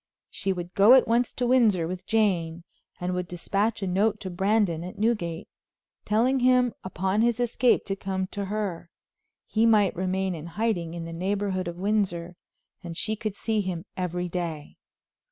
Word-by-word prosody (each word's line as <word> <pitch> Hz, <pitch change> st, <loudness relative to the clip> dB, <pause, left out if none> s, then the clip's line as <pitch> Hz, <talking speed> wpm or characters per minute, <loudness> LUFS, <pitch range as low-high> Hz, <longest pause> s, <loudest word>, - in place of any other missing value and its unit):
She 195 Hz, -, -2 dB
would 175 Hz, -1 st, -5 dB
go 205 Hz, +5 st, +7 dB
at 260 Hz, -, +6 dB
once 235 Hz, +1 st, +2 dB
to 250 Hz, -, -1 dB
Windsor 225 Hz, -9 st, +3 dB
with 180 Hz, +1 st, -6 dB
Jane, 175 Hz, -7 st, +1 dB, 0.4 s
and 180 Hz, 0 st, -2 dB
would 180 Hz, -1 st, -2 dB
dispatch 200 Hz, +5 st, -1 dB
a -, -, -1 dB
note 205 Hz, +4 st, +1 dB
to 190 Hz, -3 st, -5 dB
Brandon, 190 Hz, -2 st, +1 dB
at 180 Hz, -, -8 dB
Newgate, 205 Hz, -6 st, -1 dB, 0.6 s
telling 245 Hz, +5 st, +2 dB
him 250 Hz, -1 st, +4 dB
upon 190 Hz, +2 st, -1 dB
his 235 Hz, 0 st, +2 dB
escape 245 Hz, +1 st, +2 dB
to 195 Hz, -, -2 dB
come 190 Hz, -1 st, -3 dB
to 200 Hz, -1 st, -3 dB
her. 195 Hz, -4 st, -3 dB, 0.6 s
He 225 Hz, +1 st, +2 dB
might 210 Hz, -4 st, +4 dB
remain 185 Hz, +1 st, -1 dB
in 160 Hz, -1 st, -7 dB
hiding 180 Hz, -7 st, -1 dB
in 170 Hz, -1 st, -5 dB
the 165 Hz, -, -7 dB
neighborhood 190 Hz, +1 st, -1 dB
of 170 Hz, 0 st, -5 dB
Windsor, 185 Hz, -3 st, -1 dB, 0.5 s
and 170 Hz, -1 st, -6 dB
she 215 Hz, 0 st, -1 dB
could 215 Hz, -2 st, -4 dB
see 220 Hz, 0 st, 0 dB
him 185 Hz, -2 st, -4 dB
every 180 Hz, -1 st, -2 dB
day. 170 Hz, -4 st, -5 dB
190 Hz, 170 wpm, -26 LUFS, 175-220 Hz, 0.6 s, go